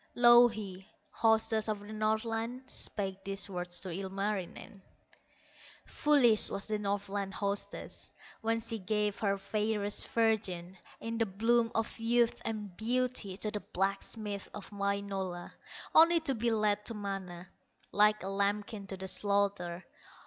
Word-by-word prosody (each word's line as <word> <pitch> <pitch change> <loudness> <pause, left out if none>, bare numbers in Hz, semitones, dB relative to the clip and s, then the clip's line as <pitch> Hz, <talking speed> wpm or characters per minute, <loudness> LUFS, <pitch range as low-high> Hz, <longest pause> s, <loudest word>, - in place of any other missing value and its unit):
Louhi, 220 -5 +5 0.2
hostess 220 -1 +2
of 210 -1 -2
the 205 +1 -9
Northland, 225 +3 -1
Spake 195 -6 -2
these 195 0 -1
words 180 -2 -3
to 190 - -5
Ilmarinen: 195 +2 -4 1.0
"Foolish 260 -8 +5
was 195 - -1
the 215 -1 -1
Northland 200 -1 -2
hostess, 200 0 -3 0.3
When 225 0 +1
she 225 0 -2
gave 210 +1 -1
her 200 -2 +1
fairest 210 +1 -1
virgin, 200 -6 0 0.2
In 230 0 -4
the 225 - +2
bloom 230 +4 +2
of 225 +1 -2
youth 235 +1 +2
and 210 -4 -4
beauty 235 -3 0
To 215 +1 -2
the 210 - -2
blacksmith 200 +2 -3
of 210 0 -9
Wainola, 200 -3 -3 0.4
Only 335 +1 +7
to 280 -4 0
be 235 0 0
led 210 -2 +1
to 230 - -3
Mana, 190 -3 -6 0.4
Like 210 0 +4
a - - -3
lambkin 200 +1 -1
to 195 - -6
the 190 0 -5
slaughter! 195 -3 0
205 Hz, 135 wpm, -32 LUFS, 195-225 Hz, 1.0 s, Only